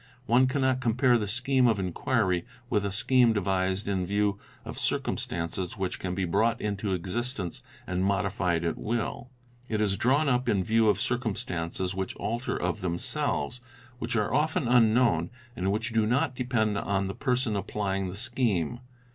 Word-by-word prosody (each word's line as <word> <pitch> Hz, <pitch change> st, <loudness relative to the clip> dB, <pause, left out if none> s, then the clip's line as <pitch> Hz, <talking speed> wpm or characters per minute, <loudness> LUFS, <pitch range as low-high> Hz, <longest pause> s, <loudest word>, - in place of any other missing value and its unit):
One 125 Hz, +2 st, +4 dB
cannot 130 Hz, -1 st, +1 dB
compare 125 Hz, +1 st, +3 dB
the 105 Hz, -, -2 dB
scheme 125 Hz, +4 st, +3 dB
of 115 Hz, -3 st, +3 dB
inquiry 90 Hz, -1 st, 0 dB, 0.3 s
with 105 Hz, -, +2 dB
a 100 Hz, -, -1 dB
scheme 120 Hz, +3 st, +4 dB
devised 95 Hz, -1 st, 0 dB
in 95 Hz, -2 st, 0 dB
view 100 Hz, +1 st, 0 dB, 0.3 s
of -, -, -6 dB
circum -, -, 0 dB
'stances 85 Hz, +2 st, -4 dB
which 95 Hz, -2 st, -3 dB
can 90 Hz, -1 st, -3 dB
be 95 Hz, 0 st, 0 dB
brought 115 Hz, +7 st, +1 dB
into 100 Hz, -2 st, -1 dB
existence 95 Hz, 0 st, -3 dB, 0.2 s
and 90 Hz, 0 st, -1 dB
modified 95 Hz, -3 st, 0 dB
at 85 Hz, -, -2 dB
will. 120 Hz, +2 st, -3 dB, 0.4 s
It 110 Hz, -, 0 dB
is 100 Hz, -2 st, +1 dB
drawn 140 Hz, +5 st, +2 dB
up 125 Hz, -1 st, +1 dB
in 95 Hz, -2 st, +2 dB
view 110 Hz, +2 st, +3 dB
of -, -, +2 dB
circumstances 95 Hz, -7 st, -2 dB
which 95 Hz, 0 st, -3 dB
alter 120 Hz, +3 st, -2 dB
of 90 Hz, -1 st, -2 dB
themselves, 85 Hz, -, -2 dB, 0.4 s
which 115 Hz, 0 st, -3 dB
are 105 Hz, +1 st, 0 dB
often 150 Hz, -2 st, +1 dB
unknown, 115 Hz, -7 st, +4 dB, 0.3 s
and 95 Hz, -2 st, 0 dB
which 115 Hz, +3 st, -2 dB
do 110 Hz, -2 st, +2 dB
not 125 Hz, +2 st, +1 dB
depend 120 Hz, -5 st, 0 dB
on 100 Hz, -1 st, 0 dB
the 95 Hz, -, -3 dB
person 125 Hz, -3 st, 0 dB
applying 95 Hz, -1 st, -2 dB
the 90 Hz, -, -6 dB
scheme. 120 Hz, -, 0 dB
105 Hz, 165 wpm, -28 LUFS, 95-120 Hz, 0.4 s, One